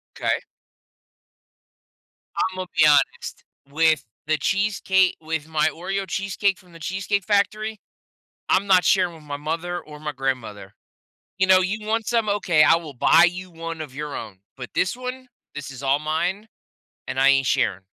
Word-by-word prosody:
'Kay. - - 0 2.1
Imma 185 0 -4
be - - +6
honest, 145 -1 +2 0.3
with 155 +1 +2 0.2
the 155 0 +2
cheesecake 190 +1 +1
with 160 -1 -4
my 155 -1 +1
Oreo 195 +4 -4
cheesecake 195 +1 -1
from 180 -4 -20
The 165 - -12
Cheesecake 195 +3 -2
Factory, 215 +2 0 0.7
I'm 195 +2 +2
not 185 -2 +5
sharing 180 -3 +3
with 160 - -14
my 145 -1 -5
mother 165 +4 -3
or 150 -1 -12
my 150 0 -5
grandmother. 125 -7 -4 0.6
You 190 - +3
know, 185 0 +6
"You 210 +3 -2
want 225 0 -1
some? 230 -3 +1
Okay, 180 -6 +3
I 165 - +6
will 160 -4 -7
buy 160 +7 +5
you 180 +1 -1
one 165 -1 -7
of 150 -4 -7
your 150 0 -5
own, 100 -4 -8 0.2
but 125 -2 -8
this 185 +6 +1
one, 255 +1 -7 0.3
this 140 -1 -6
is 135 0 -10
all 135 +2 +3
mine, 175 +8 -2 0.6
and 130 - -3
I 135 +1 +5
ain't 135 -1 +3
sharing." 95 -6 0
170 Hz, 165 wpm, -23 LUFS, 150-195 Hz, 2.1 s, be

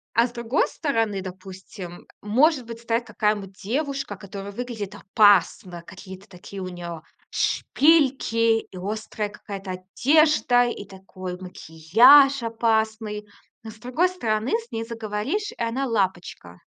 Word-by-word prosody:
а 230 +2 +4
с - - -13
другой 235 +2 0
стороны, 225 - -1
допустим, 185 -1 -10 0.2
может 255 +5 +2
быть, 230 0 -8
стоит 235 +1 -1
какая-то 210 -2 -1
девушка, 260 +5 -4
которая 200 +1 -8
выглядит 220 -3 -6
опасно, 195 -3 +2
какие-то 190 +2 -12
такие 190 +2 -10
у 185 - -4
неё 175 -2 -7 0.3
шпильки, 260 -7 +2
и 190 - -12
острая 210 +2 -4
какая-то 195 -2 -8
одежда, 265 - +3
и 240 -4 -5
такой 185 -2 -9
макияж 225 - +5
опасный. 220 -2 -1 0.4
Но 220 - -8
с 220 - -16
другой 255 +10 +1
стороны, 225 -11 -2
с 460 +1 -2
ней 225 - -3
заговоришь, 230 - -3
и - - -14
она- 250 +4 -1
лапочка. 185 - -3
215 Hz, 130 wpm, -24 LUFS, 190-245 Hz, 0.4 s, макияж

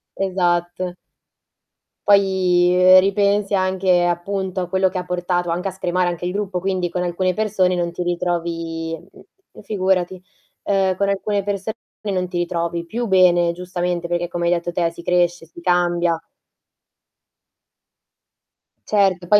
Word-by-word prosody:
esatto. 180 -1 -1 1.1
Poi, 185 -3 +4
uhm, 185 +1 +7
ripensi 200 +1 +1
anche 185 -2 +2
appunto 185 +2 -2
a 180 - -4
quello 190 +1 +2
che 185 0 -4
ha 180 - -2
portato 175 0 -1
anche 180 +3 -1
a - - -2
scremare 180 -1 -1
anche 175 -1 -4
il 180 - -1
gruppo. 195 -2 -3
Quindi 185 -1 -1
con 180 +1 -2
alcune 180 +1 0
persone 195 -4 +1
non 175 -1 -1
ti 175 - -6
ritrovi 165 -2 -2
mhmm, 385 - -19
figurati. 190 -3 0 0.5
Uhm, 190 -2 +1
con 200 +1 0
alcune 200 +1 -1
persone 205 +2 -3 0.4
non 180 -1 -1
ti 180 - -4
ritrovi 170 -1 -2
più 235 +7 -3
bene, 175 -3 +4
giustamente, 175 0 -3
perché 175 0 -2
come 175 -1 -2
hai 175 - +3
detto 175 0 -2
te, 170 -1 0
si 170 +1 -12
cresce, 175 -1 +1
si 170 - -13
cambia. 175 -1 +1 2.7
Certo, 190 -4 +2
poi 210 +3 +6
180 Hz, 145 wpm, -20 LUFS, 175-190 Hz, 2.7 s, uhm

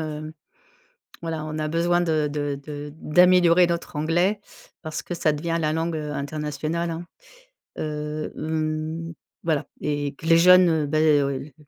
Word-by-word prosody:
heu, 155 0 -5 0.9
voilà, 160 -2 -4
on 155 0 -5
a 155 0 -1
besoin 170 +2 +2
de 155 -3 +1
de 145 -1 -2
de 145 0 -7
d'améliorer 180 +2 +5
notre 170 -1 -3
anglais 175 +7 +1 0.4
parce 155 -2 -5
que - - -7
ça 160 -3 +1
devient 165 +2 -2
la 155 0 0
langue, 165 0 -1
heu, 150 -1 -4
internationale, 155 +3 -3
hein, 165 +1 -5 0.7
heu, 150 0 -4
mmh, 155 +1 -3 0.3
voilà 160 -3 0 0.2
et 145 -1 -2
que 160 - -8
les 165 0 +6
jeunes, 180 +1 +7
heu, 160 -2 +1
bah, 155 +1 +1
oui 145 -3 +3
l 135 +2 -8
155 Hz, 160 wpm, -24 LUFS, 150-165 Hz, 0.9 s, jeunes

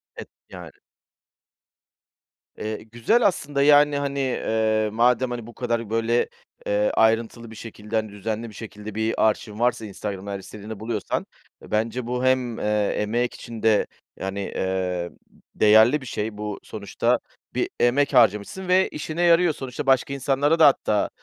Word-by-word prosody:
Evet, - - -9 0.2
yani. 90 -5 -10 1.9
Eee, 110 0 -5
güzel 210 - +3
aslında, 145 -7 -1
yani, 145 0 +5
hani, 140 -2 -1
ııı, 110 -1 +1
madem, 125 +2 +2
hani, 120 -2 -5
bu 120 - -11
kadar, 115 -2 -2
böyle, 115 +2 +1 0.4
eee, 105 +1 +1
ayrıntılı 115 +1 +1
bir 110 - -10
şekilde, 105 0 -8
hani, 110 -1 0
düzenli 110 +3 -4
bir - - -14
şekilde 105 -2 -9
bir 110 0 +1
arşivin 105 0 -5
varsa 120 -2 +1
Instagram'da 100 0 -6
her 100 - -4
istediğini 105 +2 -9
buluyorsan 110 -2 -3 0.4
bence 115 +3 -2
bu 125 +1 -2
hem, 130 -3 +1
eee, 105 -1 0
emek 120 +4 0
için 115 -2 -9
de, 110 -2 +3 0.3
yani, 95 +1 -4 0.2
eee, 90 -2 -2 0.5
değerli 110 +7 +5
bir 130 - -10
şey. 105 -2 -4
Bu 105 -1 -5
sonuçta - - -1 0.4
bir - - 0
emek 135 +4 +2
harcamışsın 115 - +2
ve 185 +1 +3
işine 155 +3 -4
yarıyor. 170 -1 +4
Sonuçta 130 -2 -6
başka 135 +1 +2
insanlara 140 +4 +1
da 155 - +9
hatta, 105 -6 +2
115 Hz, 150 wpm, -24 LUFS, 105-130 Hz, 1.9 s, da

